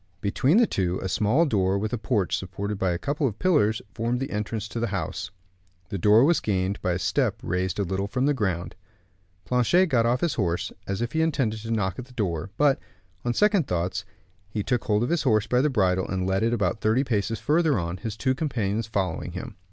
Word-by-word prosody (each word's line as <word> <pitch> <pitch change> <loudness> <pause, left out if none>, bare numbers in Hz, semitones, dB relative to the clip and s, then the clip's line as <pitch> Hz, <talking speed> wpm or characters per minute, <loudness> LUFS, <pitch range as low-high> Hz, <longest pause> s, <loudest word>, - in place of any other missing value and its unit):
Between 130 - +2
the 240 - +6
two, 90 - -1
a - - -1
small 110 - +2
door, 95 - +1
with 105 +3 -2
a - - +1
porch 105 -5 0
supported 95 +2 -4
by 95 - +1
a 85 - 0
couple 145 - -1
of 110 -4 -4
pillars, 145 - +2
formed 120 +2 -1
the 135 - -4
entrance 105 +1 -3
to 115 - -4
the 115 - 0
house. - - -3 0.6
The 100 -3 -3
door 105 +6 +6
was 170 +4 +4
gained 95 -1 -1
by 90 -3 0
a - - 0
step 90 - +1
raised 90 0 -1
a 100 - +1
little 95 +2 -2
from 125 +5 0
the 145 - +3
ground. 95 -9 -2 0.7
Planchet 125 - +3
got 115 -4 +3
off 125 +2 +1
his 170 -4 +1
horse, 90 -5 -1 0.2
as 100 +3 -2
if 120 - -3
he 160 - +1
intended 130 -9 0
to 115 +1 -8
knock 95 -5 -1
at 125 - -5
the 130 - -18
door; 90 -6 -2
but, 145 -2 +3 0.4
on 120 -1 -1
second 205 -7 +3
thoughts, 90 +1 -1 0.5
he 105 0 -2
took 125 -1 -1
hold 105 +1 +2
of 120 - -1
his 170 - +2
horse 110 -5 +2
by 125 +1 +2
the 150 - +2
bridle, 95 -7 +1
and 95 -1 -2
led 95 +1 +1
it 115 +1 +2
about 105 -2 0
thirty 110 +5 +2
paces 115 -3 -1
further 150 - +2
on, 85 0 -3
his 110 +1 -5
two 130 +4 +1
companions 115 -7 -1
following 95 -6 -2
him. - - -7
110 Hz, 225 wpm, -25 LUFS, 95-130 Hz, 0.7 s, the